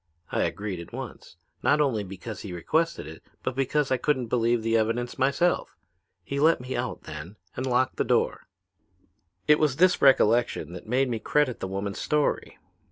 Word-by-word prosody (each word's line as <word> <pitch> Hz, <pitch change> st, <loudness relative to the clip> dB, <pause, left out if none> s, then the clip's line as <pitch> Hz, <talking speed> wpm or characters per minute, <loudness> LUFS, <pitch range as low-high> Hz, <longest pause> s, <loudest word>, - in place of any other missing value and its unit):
I -, -, 0 dB
agreed 100 Hz, -3 st, -4 dB
at 85 Hz, -, -10 dB
once, -, -, -8 dB, 0.3 s
not 145 Hz, -, +3 dB
only 130 Hz, -8 st, +1 dB
because 100 Hz, +3 st, -7 dB
he 95 Hz, -, -7 dB
requested 160 Hz, -, 0 dB
it 80 Hz, +1 st, -10 dB, 0.2 s
but 130 Hz, -, -1 dB
because 135 Hz, +1 st, 0 dB
I 130 Hz, -, +3 dB
couldn't 130 Hz, -2 st, 0 dB
believe 120 Hz, -1 st, +1 dB
the 115 Hz, 0 st, +1 dB
evidence 115 Hz, +2 st, 0 dB
myself. 140 Hz, +7 st, +1 dB, 0.5 s
He 140 Hz, -, -3 dB
let 160 Hz, +3 st, +4 dB
me 125 Hz, +1 st, -5 dB
out 120 Hz, 0 st, -3 dB
then 80 Hz, +6 st, -8 dB, 0.2 s
and 130 Hz, -, -3 dB
locked 130 Hz, +1 st, +1 dB
the -, -, +2 dB
door. -, -, 0 dB, 1.0 s
"It 150 Hz, 0 st, +6 dB
was 150 Hz, -4 st, +2 dB
this 180 Hz, +4 st, +4 dB
recollection 120 Hz, -8 st, +3 dB
that 90 Hz, -, -9 dB
made 130 Hz, +4 st, +2 dB
me 115 Hz, -3 st, -2 dB
credit 135 Hz, +2 st, +1 dB
the -, -, -3 dB
woman's 100 Hz, +2 st, -4 dB
story. 150 Hz, -1 st, 0 dB
125 Hz, 175 wpm, -26 LUFS, 105-140 Hz, 1.0 s, It